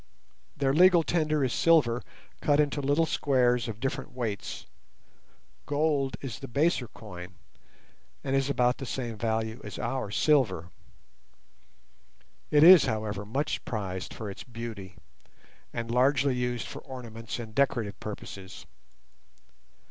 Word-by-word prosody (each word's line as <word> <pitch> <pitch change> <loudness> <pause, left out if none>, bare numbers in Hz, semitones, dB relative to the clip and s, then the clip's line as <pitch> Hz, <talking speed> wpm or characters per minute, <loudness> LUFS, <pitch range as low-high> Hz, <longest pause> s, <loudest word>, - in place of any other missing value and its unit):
Their 135 -1 +2
legal 175 +1 +6
tender 155 -3 +1
is 130 - 0
silver, 140 -8 +3 0.4
cut 145 0 +3
into 145 -1 +1
little 145 +4 +2
squares 125 -6 +2
of 110 -2 -6
different 135 +2 -3
weights; 115 -5 -4 1.0
gold 145 -2 0
is 130 -6 -6
the 135 - -7
baser 140 0 +1
coin, 90 -4 -10 0.9
and 135 -1 0
is 135 0 +1
about 125 -3 +3
of - - -32
the 135 - -6
same 120 -3 -3
value 110 +1 -2
as - - -7
our 125 -2 -2
silver. 105 - +2 1.8
It 150 0 +5
is, 180 -1 +10
however, 110 -4 -3
much 145 +7 -2
prized 95 -5 -4
for 110 - -6
its 100 - -7
beauty, 115 -6 -8 0.8
and 115 0 -4
largely 135 +2 +3
used 125 -1 -2
for - - -7
ornaments 115 -3 -7
and 115 -2 -8
decorative 115 -5 0
purposes. 100 -2 -8
125 Hz, 130 wpm, -28 LUFS, 110-140 Hz, 1.8 s, is